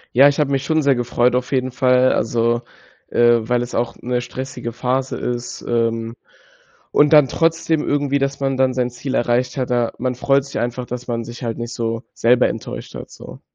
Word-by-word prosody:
Ja, 135 Hz, +3 st, +8 dB
ich 145 Hz, +1 st, +1 dB
habe 140 Hz, -2 st, 0 dB
mich 135 Hz, 0 st, 0 dB
schon 160 Hz, +2 st, +2 dB
sehr 140 Hz, -2 st, +3 dB
gefreut 120 Hz, 0 st, +1 dB
auf 125 Hz, +2 st, -2 dB
jeden 130 Hz, -1 st, 0 dB
Fall. 125 Hz, 0 st, +3 dB
Also, 115 Hz, +2 st, 0 dB, 0.5 s
äh, 120 Hz, 0 st, +5 dB
weil 120 Hz, 0 st, +1 dB
es 120 Hz, 0 st, -5 dB
auch 120 Hz, -1 st, -1 dB
‘ne 125 Hz, 0 st, -1 dB
stressige 125 Hz, -1 st, -6 dB
Phase 130 Hz, +2 st, -1 dB
ist, 120 Hz, 0 st, -4 dB
ähm, 115 Hz, -1 st, -1 dB, 0.8 s
und 150 Hz, +1 st, +4 dB
dann 150 Hz, -3 st, +7 dB
trotzdem 165 Hz, -1 st, +1 dB
irgendwie, 140 Hz, -1 st, +1 dB
dass 140 Hz, 0 st, -1 dB
man 135 Hz, -1 st, 0 dB
dann 130 Hz, -1 st, +2 dB
sein 125 Hz, -1 st, 0 dB
Ziel 130 Hz, +3 st, -4 dB
erreicht 120 Hz, +1 st, +1 dB
hat 130 Hz, -2 st, -2 dB
da 120 Hz, -2 st, +1 dB
man 125 Hz, 0 st, -1 dB
freut 135 Hz, +2 st, +2 dB
sich 140 Hz, -, -5 dB
einfach, 120 Hz, +1 st, -3 dB
dass 125 Hz, 0 st, -7 dB
man 115 Hz, -1 st, -2 dB
sich 120 Hz, +2 st, -9 dB
halt 115 Hz, -2 st, -3 dB
nicht 120 Hz, 0 st, -5 dB
so 115 Hz, 0 st, -3 dB
selber 125 Hz, +2 st, +3 dB
enttäuscht -, -, -7 dB
hat, -, -, -8 dB
so. -, -, -12 dB
125 Hz, 205 wpm, -20 LUFS, 120-135 Hz, 0.8 s, Ja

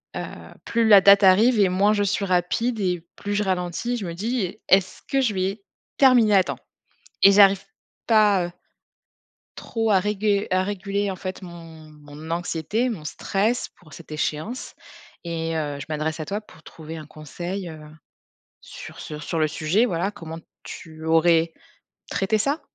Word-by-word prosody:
heu, -, -, -3 dB, 0.4 s
plus 230 Hz, -1 st, +1 dB
la 205 Hz, -3 st, +8 dB
date 200 Hz, +1 st, +7 dB
arrive 215 Hz, +5 st, +5 dB
et 200 Hz, -, +5 dB
moins 195 Hz, +3 st, +3 dB
je 205 Hz, -1 st, +1 dB
suis 200 Hz, 0 st, 0 dB
rapide 195 Hz, +6 st, 0 dB
et 180 Hz, -4 st, -1 dB
plus 205 Hz, 0 st, -4 dB
je 210 Hz, -, +1 dB
ralentis, 185 Hz, +5 st, -2 dB
je 210 Hz, -, -5 dB
me 170 Hz, -, -5 dB
dis: 210 Hz, 0 st, -2 dB
«Est-ce 190 Hz, -1 st, +3 dB
que 275 Hz, -, +1 dB
je 235 Hz, -5 st, +1 dB
vais 195 Hz, +2 st, -2 dB, 0.3 s
terminer 245 Hz, -6 st, +5 dB
à 190 Hz, -, +5 dB
temps?» -, -, -5 dB, 0.6 s
et 200 Hz, -, +9 dB
j'arrive 195 Hz, -1 st, +6 dB, 0.4 s
pas 210 Hz, -5 st, +4 dB
heu 175 Hz, -, -7 dB, 1.1 s
trop 225 Hz, -1 st, -2 dB
à 195 Hz, -, +5 dB
régu 205 Hz, +1 st, 0 dB
à 185 Hz, 0 st, +2 dB
réguler 200 Hz, 0 st, -2 dB
en -, -, -5 dB
fait 185 Hz, +2 st, -6 dB
mon 165 Hz, -3 st, -11 dB
mon 150 Hz, +1 st, -11 dB
anxiété, 175 Hz, +7 st, -1 dB
mon 200 Hz, -10 st, -5 dB
stress 210 Hz, +9 st, -1 dB
pour 155 Hz, -3 st, -18 dB
cette 170 Hz, -, -12 dB
échéance 155 Hz, +9 st, -4 dB, 0.5 s
et 165 Hz, -1 st, -3 dB
heu, 145 Hz, -2 st, -3 dB
je 140 Hz, -, -7 dB
m'adresse 155 Hz, +1 st, -2 dB
à -, -, -5 dB
toi 200 Hz, +5 st, -3 dB
pour 160 Hz, -6 st, -19 dB
trouver 160 Hz, 0 st, -10 dB
un 155 Hz, -, -9 dB
conseil 175 Hz, +5 st, -6 dB
heu, 160 Hz, -1 st, -10 dB, 0.8 s
sur -, -, -11 dB
sur 150 Hz, 0 st, -7 dB
sur 165 Hz, -, -3 dB
le 155 Hz, -1 st, +2 dB
sujet, 155 Hz, +8 st, +1 dB
voilà. 185 Hz, -3 st, -1 dB
Comment 165 Hz, -4 st, -9 dB, 0.3 s
tu 160 Hz, -1 st, -10 dB
aurais 165 Hz, 0 st, +3 dB, 0.6 s
traité 200 Hz, +3 st, +1 dB
ça? 280 Hz, +9 st, -1 dB
185 Hz, 170 wpm, -23 LUFS, 165-210 Hz, 1.1 s, et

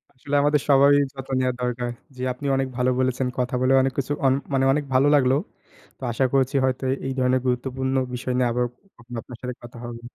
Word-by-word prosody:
আসলে 140 Hz, +3 st, -4 dB
আমাদের 145 Hz, -1 st, +3 dB
সবারই 140 Hz, +1 st, +6 dB, 0.2 s
যত্ন 135 Hz, 0 st, -8 dB
নেওয়া 130 Hz, -1 st, +1 dB
দরকার। 125 Hz, 0 st, -2 dB, 0.3 s
জ্বী, 125 Hz, -, -6 dB
আপনি 140 Hz, +3 st, -10 dB
অনেক 135 Hz, 0 st, 0 dB
ভালো 125 Hz, 0 st, +2 dB
বলেছেন। 130 Hz, 0 st, 0 dB
কথা 125 Hz, 0 st, -1 dB
বলে 130 Hz, +1 st, +3 dB
অনেক 135 Hz, 0 st, 0 dB
কিছু, 140 Hz, +1 st, -1 dB
অনে 130 Hz, +1 st, +3 dB, 0.2 s
মানে 135 Hz, 0 st, +2 dB
অনেক 145 Hz, 0 st, 0 dB
ভালো 135 Hz, +3 st, +5 dB
লাগলো। 130 Hz, -1 st, +4 dB, 0.6 s
তো -, -, -36 dB
আশা 130 Hz, +3 st, +1 dB
করছি 135 Hz, +1 st, +2 dB
হয়তো 130 Hz, 0 st, -1 dB
এ -, -, +3 dB
এই 135 Hz, -, -2 dB
ধরনের 130 Hz, 0 st, +2 dB
গুরুত্বপূর্ণ 130 Hz, +1 st, -1 dB, 0.2 s
বিষয় 125 Hz, +1 st, -3 dB
নিয়ে, 125 Hz, -2 st, +2 dB
আবার 125 Hz, +1 st, +1 dB, 0.4 s
আপনার 120 Hz, 0 st, -8 dB
সাথে 125 Hz, -1 st, -5 dB
কথা 120 Hz, 0 st, -11 dB
হবে 120 Hz, 0 st, -7 dB
130 Hz, 205 wpm, -24 LUFS, 125-135 Hz, 0.6 s, সবারই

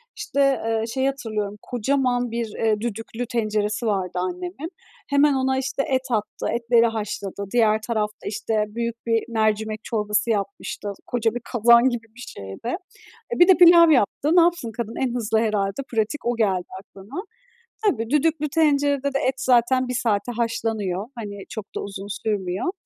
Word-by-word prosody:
İşte, 275 Hz, -3 st, +1 dB
ııı, 225 Hz, 0 st, 0 dB
şeyi 265 Hz, +3 st, 0 dB
hatırlıyorum, 215 Hz, -7 st, -3 dB
kocaman 245 Hz, 0 st, 0 dB
bir, 230 Hz, -2 st, -3 dB
ııı, 220 Hz, -2 st, +2 dB
düdüklü 225 Hz, +1 st, -4 dB
tenceresi 215 Hz, -1 st, -1 dB
vardı 195 Hz, -4 st, 0 dB
annemin. 180 Hz, -, -4 dB, 0.4 s
Hemen 285 Hz, +1 st, +4 dB
ona 265 Hz, 0 st, +1 dB
işte 270 Hz, +1 st, -1 dB
et 260 Hz, -1 st, 0 dB
attı, 215 Hz, -3 st, -2 dB
etleri 235 Hz, 0 st, +3 dB
haşladı. 205 Hz, -3 st, -3 dB
Diğer 220 Hz, -2 st, +4 dB
tarafta, 215 Hz, -2 st, -2 dB
işte, 215 Hz, +1 st, -1 dB
büyük 235 Hz, +2 st, -3 dB
bir 225 Hz, -1 st, +2 dB
mercimek 220 Hz, -1 st, 0 dB
çorbası 210 Hz, 0 st, 0 dB
yapmıştı. 200 Hz, 0 st, -3 dB
Koca 230 Hz, -2 st, 0 dB
bir 245 Hz, -, -3 dB
kazan 235 Hz, +1 st, +6 dB
gibi 230 Hz, -2 st, -5 dB
bir 250 Hz, -, -11 dB
şeydi. 95 Hz, -, -8 dB, 0.7 s
E, -, -, -6 dB
bir 350 Hz, -, +8 dB
de 375 Hz, -, +9 dB
pilav 340 Hz, -2 st, +8 dB
yaptı. 290 Hz, -, +2 dB
Ne 350 Hz, -, +8 dB
yapsın 335 Hz, -9 st, +1 dB
kadın? 230 Hz, -1 st, -4 dB
En 245 Hz, -2 st, 0 dB
hızlı 220 Hz, -2 st, 0 dB
herhâlde, 210 Hz, +1 st, 0 dB
pratik 225 Hz, +6 st, -1 dB
o 240 Hz, -, +1 dB
geldi 190 Hz, -5 st, +1 dB
aklına. 200 Hz, -, -9 dB, 0.7 s
Tabii, 230 Hz, -, +1 dB
düdüklü 300 Hz, 0 st, +1 dB
tencerede 285 Hz, -3 st, +2 dB
de 275 Hz, -, +1 dB
et 260 Hz, 0 st, +1 dB
zaten 255 Hz, 0 st, +3 dB
1 250 Hz, -, -3 dB
saate 225 Hz, -1 st, 0 dB
haşlanıyor. 220 Hz, -4 st, -1 dB
Hani, 205 Hz, -3 st, -6 dB
çok 215 Hz, -4 st, -6 dB
da -, -, -2 dB
uzun 200 Hz, 0 st, -7 dB, 0.2 s
sürmüyor. 200 Hz, -, -1 dB
230 Hz, 160 wpm, -23 LUFS, 210-260 Hz, 0.7 s, de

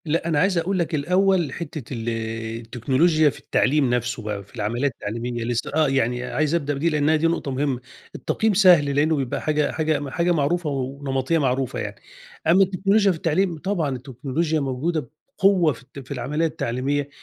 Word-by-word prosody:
لأ، 165 Hz, +2 st, 0 dB
أنا 160 Hz, -3 st, +1 dB
عايز 185 Hz, +1 st, +2 dB
أقول 185 Hz, +3 st, 0 dB
لك 170 Hz, -1 st, -1 dB
الأوّل 180 Hz, 0 st, +2 dB
حتّة 150 Hz, -6 st, -6 dB
ال 115 Hz, -1 st, -3 dB, 0.5 s
التكنولوجيا 135 Hz, +7 st, +2 dB
في -, -, -9 dB
التعليم 140 Hz, -1 st, +2 dB
نفسه 120 Hz, -1 st, -2 dB
بقى، 105 Hz, -2 st, -4 dB
في 100 Hz, -, -19 dB
العملية 120 Hz, +5 st, -1 dB
التعليمية 120 Hz, 0 st, -4 dB
لسّه، 120 Hz, 0 st, -2 dB
آه، 155 Hz, -1 st, +4 dB
يعني 125 Hz, -2 st, 0 dB
عايز 150 Hz, +5 st, 0 dB
أبدأ 145 Hz, -3 st, -1 dB
بدي 150 Hz, +4 st, 0 dB
لأن 150 Hz, -1 st, +1 dB
هي 160 Hz, -, +4 dB
دي 165 Hz, +2 st, +2 dB
نقطة 165 Hz, -4 st, -1 dB
مهمّة، 135 Hz, -1 st, -1 dB, 0.4 s
التقييم 220 Hz, -1 st, 0 dB
سهل 175 Hz, -8 st, +5 dB
لأنّه 155 Hz, +3 st, +3 dB
بيبقى 135 Hz, -4 st, -2 dB
حاجة 150 Hz, -1 st, +1 dB
حاجة 155 Hz, -3 st, -1 dB
حاجة 170 Hz, +5 st, +1 dB
معروفة 165 Hz, +1 st, +1 dB
ونمطية 135 Hz, +2 st, -1 dB
معروفة 130 Hz, -3 st, 0 dB
يعني، -, -, -4 dB, 0.5 s
أمّا 180 Hz, +4 st, +6 dB
التكنولوجيا 195 Hz, +2 st, +2 dB
في 170 Hz, -, -3 dB
التعليم 170 Hz, +2 st, 0 dB
طبعًا 165 Hz, -5 st, -1 dB
التكنولوجيا 140 Hz, +5 st, -2 dB
موجودة 140 Hz, +1 st, -2 dB, 0.3 s
بقوة 185 Hz, -6 st, +4 dB
في -, -, -14 dB
الت 140 Hz, +2 st, -12 dB
في 130 Hz, 0 st, -12 dB
العمليّة 140 Hz, +6 st, -1 dB
التعليمية، 140 Hz, -1 st, -2 dB
145 Hz, 180 wpm, -23 LUFS, 130-165 Hz, 0.5 s, أمّا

